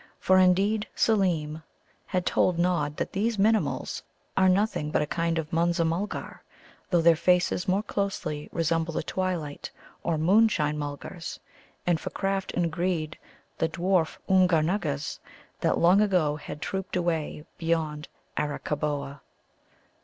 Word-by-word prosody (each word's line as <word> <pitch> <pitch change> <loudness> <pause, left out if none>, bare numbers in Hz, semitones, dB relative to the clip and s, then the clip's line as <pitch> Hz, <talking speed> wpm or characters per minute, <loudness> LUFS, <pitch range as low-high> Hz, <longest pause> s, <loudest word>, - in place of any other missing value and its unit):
For, 185 0 +4
indeed, 195 +4 +3
Seelem 165 -8 +1 0.5
had 185 -2 -1
told 180 -2 +2
Nod 170 -4 0
that - - -3
these 220 +3 0
Minimuls 215 +2 +1 0.3
are 190 0 +5
nothing 185 -5 +1
but 150 - +1
a - - -1
kind 165 +2 -1
of 160 +1 -4
Munza 170 0 +2
mulgar, 170 +6 -3 0.5
though 175 -3 +3
their 170 0 +7
faces 180 +2 +2
more 190 +3 +2
closely 180 -8 -3
resemble 165 0 0
the - - -1
twilight 175 -6 -3 0.3
or 165 -2 0
moonshine 170 -3 +3
Mulgars, 145 +4 -6 0.5
and 175 -2 +2
for - - -5
craft 195 0 -2
and 170 -2 0
greed 165 -2 -1 0.4
the 160 - +1
dwarf 175 -1 +1
Oomgar 185 -4 +4
nuggas, 155 -5 -2 0.4
that - - +1
long 180 +4 +5
ago 180 -8 +2
had 150 0 -7
trooped 190 -1 -4
away 165 -4 -1
beyond 160 -2 -1 0.3
Arakkaboa. 145 -1 -2
170 Hz, 135 wpm, -27 LUFS, 155-190 Hz, 0.5 s, their